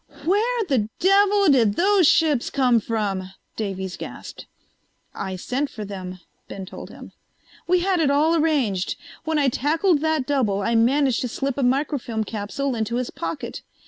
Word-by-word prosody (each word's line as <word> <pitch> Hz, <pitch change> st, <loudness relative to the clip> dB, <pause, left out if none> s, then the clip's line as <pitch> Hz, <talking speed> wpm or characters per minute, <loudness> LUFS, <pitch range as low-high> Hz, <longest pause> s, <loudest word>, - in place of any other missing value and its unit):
"Where 445 Hz, +6 st, +1 dB
the 235 Hz, -8 st, +1 dB
devil 400 Hz, +1 st, +4 dB
did 230 Hz, -7 st, +4 dB
those 385 Hz, -, +4 dB
ships 300 Hz, -7 st, +3 dB
come 250 Hz, -4 st, +3 dB
from?" 200 Hz, -4 st, -2 dB, 0.3 s
Davies 190 Hz, -3 st, -4 dB
gasped. -, -, -9 dB, 0.7 s
"I 190 Hz, -1 st, -4 dB
sent 260 Hz, +10 st, -2 dB
for 215 Hz, -2 st, -7 dB
them," 185 Hz, -2 st, -7 dB, 0.3 s
Ben 195 Hz, -1 st, -7 dB
told -, -, -10 dB
him. -, -, -12 dB, 0.6 s
"We 360 Hz, 0 st, +3 dB
had 375 Hz, -1 st, +1 dB
it 305 Hz, -4 st, +2 dB
all 305 Hz, +4 st, +3 dB
arranged. 275 Hz, -, +1 dB, 0.3 s
When 320 Hz, -1 st, 0 dB
I 285 Hz, -2 st, +3 dB
tackled 300 Hz, +5 st, +1 dB
that 315 Hz, -4 st, 0 dB
double 225 Hz, -9 st, 0 dB
I 230 Hz, -, 0 dB
managed 255 Hz, +3 st, +3 dB
to 250 Hz, -, -1 dB
slip 270 Hz, +3 st, -3 dB
a 280 Hz, -, -2 dB
microfilm 250 Hz, -3 st, 0 dB
capsule 225 Hz, +6 st, -3 dB
into 225 Hz, 0 st, -2 dB
his 250 Hz, 0 st, -2 dB
pocket. -, -, -5 dB
265 Hz, 160 wpm, -23 LUFS, 215-315 Hz, 0.7 s, devil